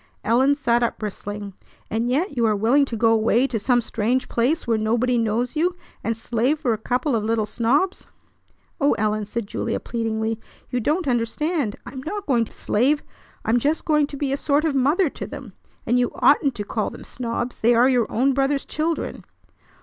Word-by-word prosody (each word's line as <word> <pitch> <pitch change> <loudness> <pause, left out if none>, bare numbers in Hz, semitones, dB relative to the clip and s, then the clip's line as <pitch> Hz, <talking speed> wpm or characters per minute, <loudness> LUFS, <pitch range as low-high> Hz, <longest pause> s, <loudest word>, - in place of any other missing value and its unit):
Ellen 260 +6 +3
sat 240 -4 +1
up 235 - 0
bristling. 205 -1 -6 0.3
"And 230 +2 -1
yet 290 +6 0
you 240 - +1
are 215 - +2
willing 240 +8 +3
to 235 -4 -5
go 225 0 +4
away 225 +3 +3
to 240 -5 -2
some 245 +3 +2
strange 235 +3 -1
place 265 +8 +1
where 225 -2 +1
nobody 235 +3 +1
knows 235 +3 0
you, 345 +3 +1 0.3
and 230 -1 -1
slave 240 +6 0
for 255 -7 +1
a - - -2
couple 250 +4 0
of 215 - 0
little 220 0 +1
snobs!" 260 - 0 0.7
"O 285 -1 +3
Ellen!" 215 0 0
said 225 +2 -4
Julia - - -2
pleadingly. 225 -1 -2 0.3
"You 250 - 0
don't 305 +7 0
understand. 255 - 0
I 240 - -8
am 260 0 -7
not 405 +8 -5
going 240 -5 +2
to - - -15
slave. 275 +7 +1 0.4
I'm 235 +2 +3
just 295 +6 0
going 300 -2 +3
to 285 - -8
be 275 -1 -1
a - - 0
sort 290 +2 +1
of 315 - +1
mother 290 +8 +3
to - - -6
them. 250 -8 -9 0.3
And 245 +2 +2
you 245 - +2
oughtn't 280 -2 +3
to 205 - -3
call 215 +1 -2
them - - -11
snobs. 240 0 -4
They 235 +2 +4
are 240 +2 +5
your 245 -4 +2
own 265 +4 +2
brother's 275 +1 +1
children." 320 +1 -2
245 Hz, 200 wpm, -23 LUFS, 225-280 Hz, 0.7 s, are